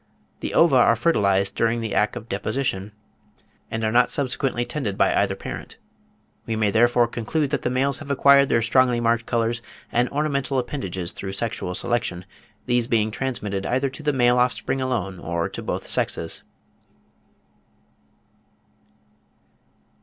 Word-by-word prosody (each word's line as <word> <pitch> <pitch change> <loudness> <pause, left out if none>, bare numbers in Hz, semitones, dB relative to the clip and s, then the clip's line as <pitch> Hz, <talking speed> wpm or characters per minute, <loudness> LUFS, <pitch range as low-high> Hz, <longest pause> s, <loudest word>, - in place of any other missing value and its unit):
The - - -4
ova 165 -6 +5
are 115 -1 +5
fertilised 100 -8 +2
during 115 +1 +1
the 110 -3 -3
act 105 - +1
of 110 - -7
deposition, 105 -1 -2 0.8
and 110 0 -3
are 110 - +1
not 120 +2 +4
subsequently 130 -3 -1
tended 110 -10 -3
by - - +3
either - - +1
parent. - - -8 0.7
We 115 - -1
may 110 -2 +1
therefore 120 +2 +4
conclude 130 +5 -2
that 145 - 0
the - - -1
males 135 +2 0
have 150 - -10
acquired 140 0 +5
their 115 - +2
strongly 125 +1 +3
marked 115 0 +1
colours 115 0 0 0.3
and 120 +1 +2
ornamental 140 -2 -1
appendages 95 - -3
through 95 -1 -6
sexual 100 -3 -2
selection; 115 -7 -2 0.4
these 120 -2 +1
being 110 -2 +1
transmitted 105 -6 -3
either 130 +2 0
to 145 - -9
the 150 -1 +1
male 125 -2 +3
offspring 125 +2 0
alone, 105 -8 -2
or 85 0 -2
to - - -6
both - - -4
sexes. 80 0 -1
120 Hz, 145 wpm, -23 LUFS, 105-130 Hz, 0.8 s, ova